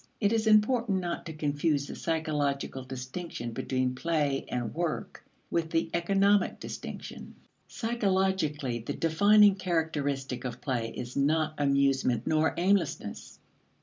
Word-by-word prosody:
It 205 Hz, 0 st, +2 dB
is 220 Hz, -1 st, +1 dB
important 215 Hz, -1 st, +4 dB
not 175 Hz, -2 st, -4 dB
to 160 Hz, -, -6 dB
confuse 145 Hz, -1 st, 0 dB
the -, -, -7 dB
psychological 145 Hz, -5 st, -1 dB
distinction 130 Hz, 0 st, -6 dB
between 130 Hz, +2 st, -1 dB
play 145 Hz, -1 st, 0 dB
and 120 Hz, -2 st, -3 dB
work 170 Hz, -1 st, -3 dB, 0.3 s
with 165 Hz, -1 st, 0 dB
the 165 Hz, 0 st, 0 dB
economic 195 Hz, +3 st, +2 dB
distinction. -, -, -8 dB, 0.3 s
Psychologically, 190 Hz, -, 0 dB
the 115 Hz, -, -4 dB
defining 205 Hz, +5 st, +5 dB
characteristic 155 Hz, -8 st, -2 dB
of 125 Hz, -1 st, -5 dB
play 120 Hz, -5 st, -2 dB
is 120 Hz, +1 st, -7 dB
not 155 Hz, +2 st, +2 dB
amusement 140 Hz, -4 st, +2 dB
nor 155 Hz, 0 st, +2 dB
aimlessness. 190 Hz, +3 st, 0 dB
155 Hz, 120 wpm, -29 LUFS, 135-185 Hz, 0.3 s, defining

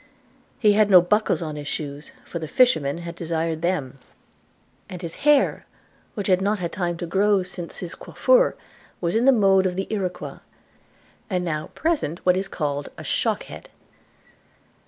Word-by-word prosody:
He 210 Hz, -3 st, +4 dB
had 210 Hz, 0 st, +4 dB
no 185 Hz, -2 st, +9 dB
buckles 200 Hz, +1 st, +1 dB
in 155 Hz, -2 st, -5 dB
his 145 Hz, -1 st, -7 dB
shoes, 145 Hz, 0 st, -5 dB
for 170 Hz, -, -5 dB
the 160 Hz, -, -5 dB
fishermen 165 Hz, -, +3 dB
had 170 Hz, -, -5 dB
desired 165 Hz, -1 st, -2 dB
them; 150 Hz, -7 st, -2 dB, 0.9 s
and 180 Hz, -, -7 dB
his 170 Hz, -2 st, -7 dB
hair, 295 Hz, -1 st, +2 dB, 0.5 s
which 205 Hz, -4 st, -3 dB
had 185 Hz, -1 st, +3 dB
not 205 Hz, +2 st, +1 dB
had 175 Hz, -3 st, -4 dB
time 175 Hz, -2 st, -2 dB
to 175 Hz, -, -4 dB
grow 200 Hz, +5 st, +2 dB
long 195 Hz, -2 st, +2 dB
since 180 Hz, -2 st, -7 dB
his 175 Hz, -2 st, -5 dB
coiffure, -, -, +2 dB, 0.4 s
was 170 Hz, +1 st, -1 dB
in 230 Hz, +2 st, +2 dB
the 270 Hz, -, +8 dB
mode 195 Hz, -5 st, +4 dB
of 180 Hz, -, -3 dB
the 190 Hz, +1 st, -2 dB
Iroquois, 190 Hz, -4 st, -4 dB, 0.9 s
and 180 Hz, -3 st, -1 dB
now 155 Hz, -2 st, -2 dB
present 310 Hz, -, -1 dB
what 180 Hz, 0 st, +5 dB
is 190 Hz, +1 st, -2 dB
called 145 Hz, -4 st, -3 dB
a -, -, -8 dB
shock -, -, 0 dB
head. -, -, -11 dB
180 Hz, 175 wpm, -23 LUFS, 165-205 Hz, 0.9 s, no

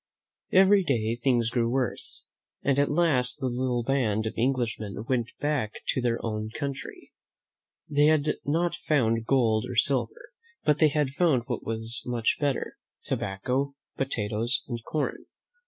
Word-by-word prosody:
Every 195 Hz, +1 st, +6 dB
day 115 Hz, -7 st, 0 dB
things 120 Hz, -2 st, +1 dB
grew 115 Hz, -1 st, +1 dB
worse, 130 Hz, 0 st, -2 dB, 0.4 s
and 140 Hz, 0 st, +2 dB
at 145 Hz, -, +3 dB
last 145 Hz, -6 st, +2 dB
the 135 Hz, -, -2 dB
little 125 Hz, -1 st, 0 dB
band 115 Hz, -5 st, +1 dB
of 110 Hz, -, -2 dB
Englishmen 115 Hz, -4 st, -1 dB
went 120 Hz, -3 st, 0 dB
back 145 Hz, -8 st, -1 dB
to 130 Hz, -, +1 dB
their 120 Hz, -1 st, +1 dB
own 110 Hz, -1 st, -3 dB
country. 140 Hz, +3 st, -6 dB, 0.8 s
They 145 Hz, -1 st, +3 dB
had 155 Hz, -1 st, +2 dB
not 165 Hz, +4 st, 0 dB
found 115 Hz, -5 st, +1 dB
gold 115 Hz, -5 st, +3 dB
or 125 Hz, -, -5 dB
silver, 145 Hz, -, 0 dB, 0.3 s
but 150 Hz, -1 st, +2 dB
they 155 Hz, -, +6 dB
had 145 Hz, -2 st, 0 dB
found 145 Hz, -5 st, +2 dB
what 120 Hz, -3 st, -4 dB
was 115 Hz, +1 st, -3 dB
much 120 Hz, -2 st, 0 dB
better, 145 Hz, -2 st, -1 dB, 0.3 s
tobacco, 130 Hz, +8 st, -2 dB, 0.2 s
potatoes 115 Hz, -2 st, -1 dB
and 120 Hz, -3 st, -5 dB
corn. 150 Hz, +3 st, -3 dB
125 Hz, 145 wpm, -27 LUFS, 115-145 Hz, 0.8 s, Every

